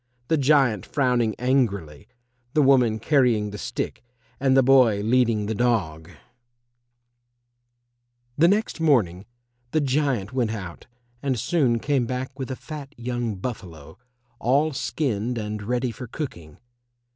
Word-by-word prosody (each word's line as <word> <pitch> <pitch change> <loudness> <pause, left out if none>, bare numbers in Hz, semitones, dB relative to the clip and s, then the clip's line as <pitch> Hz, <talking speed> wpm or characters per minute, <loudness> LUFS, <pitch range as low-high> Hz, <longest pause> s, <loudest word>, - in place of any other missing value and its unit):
[Illustration: 120 0 -44
THE 160 - +3
GIANT 130 - +3
FROWNING 125 -6 +1
ANGRILY, 100 - -1 0.5
THE 155 - +5
WOMAN 125 -5 +4
CARRYING 115 -5 +2
THE 105 - -7
STICK - - -4 0.4
AND 135 0 +3
THE 135 - +6
BOY 125 -6 +5
LEADING 115 -1 +2
THE 110 - -2
DOG] 100 -10 -1 2.3
The 165 +3 +5
next 205 0 0
morning 105 - +2 0.4
the 155 - +1
giant 135 -6 0
went 125 -4 0
out 95 -6 -8 0.3
and 130 -4 -1
soon 130 -5 +1
came 130 0 0
back 130 +2 -5
with 130 - -4
a 130 - -3
fat 150 0 -9
young 120 -2 -3
buffalo, 90 - -8 0.4
all 145 +6 +2
skinned 125 -4 -2
and 105 -1 -4
ready 125 +3 -1
for 125 +2 -8
cooking. 85 - -7
125 Hz, 135 wpm, -24 LUFS, 105-135 Hz, 2.3 s, THE